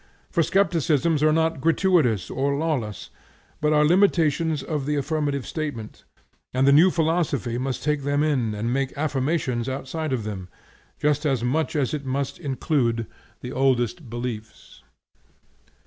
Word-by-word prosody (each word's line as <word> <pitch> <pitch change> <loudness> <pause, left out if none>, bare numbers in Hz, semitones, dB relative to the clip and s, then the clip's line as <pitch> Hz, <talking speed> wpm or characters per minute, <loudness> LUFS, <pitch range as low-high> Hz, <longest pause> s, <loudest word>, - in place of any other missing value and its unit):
For 170 - +2
skepticisms 165 -4 +2
are 155 0 +4
not 160 -1 +1
gratuitous 160 - +2
or 140 +2 0
lawless, 140 - -3 0.5
but 150 0 +2
are 150 0 +4
limitations 165 -4 +2
of 150 -4 -3
the 150 - +1
affirmative 145 -2 -1
statement, 145 -9 -5 0.5
and 130 +1 +3
the 140 - +6
new 165 +6 +7
philosophy 160 -8 0
must 130 0 -3
take 150 -1 0
them 145 +1 +1
in 125 -8 0
and 115 +3 -2
make 135 0 -2
affirmations 135 -4 -1
outside 140 +4 -4
of 125 -4 -1
them, 95 -4 -6 0.5
just 150 0 +1
as 135 -6 0
much 155 +7 0
as 140 -3 0
it 150 -2 -3
must 135 +1 -3
include 130 -5 0 0.4
the 125 - -6
oldest 135 +3 0
beliefs. 120 -2 -7
140 Hz, 145 wpm, -24 LUFS, 125-155 Hz, 0.5 s, new